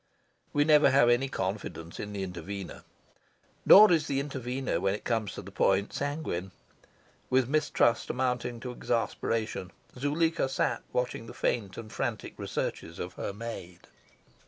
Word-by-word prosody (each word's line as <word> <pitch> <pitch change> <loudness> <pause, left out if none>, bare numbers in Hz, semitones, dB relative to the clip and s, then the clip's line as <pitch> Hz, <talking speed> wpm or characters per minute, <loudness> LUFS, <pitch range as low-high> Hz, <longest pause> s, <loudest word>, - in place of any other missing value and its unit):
We 145 - +3
never 150 0 +6
have 125 -3 +5
any 125 +3 +3
confidence 95 -6 -4
in 105 - -5
the 100 -1 -3
intervener. 95 +1 -6 0.8
Nor 210 -1 +10
is 160 -3 +3
the 135 -1 0
intervener, 130 -3 -2
when 95 +1 +1
it - - -9
comes 110 -4 -1
to - - -7
the - - -10
point, 95 +1 +2
sanguine. 145 - -3 0.8
With 130 -1 +3
mistrust 135 -5 +2
mounting 125 -2 -1
to 125 - -5
exasperation 115 -5 -2 0.3
Zuleika 150 +3 +1
sat 135 - 0
watching 125 -2 -2
the - - -10
faint 100 -6 -1
and 110 -2 -8
frantic - - -3
researches 85 - -4
of 90 +1 -5
her - - -4
maid. 100 -5 -7
120 Hz, 145 wpm, -29 LUFS, 100-135 Hz, 0.8 s, Nor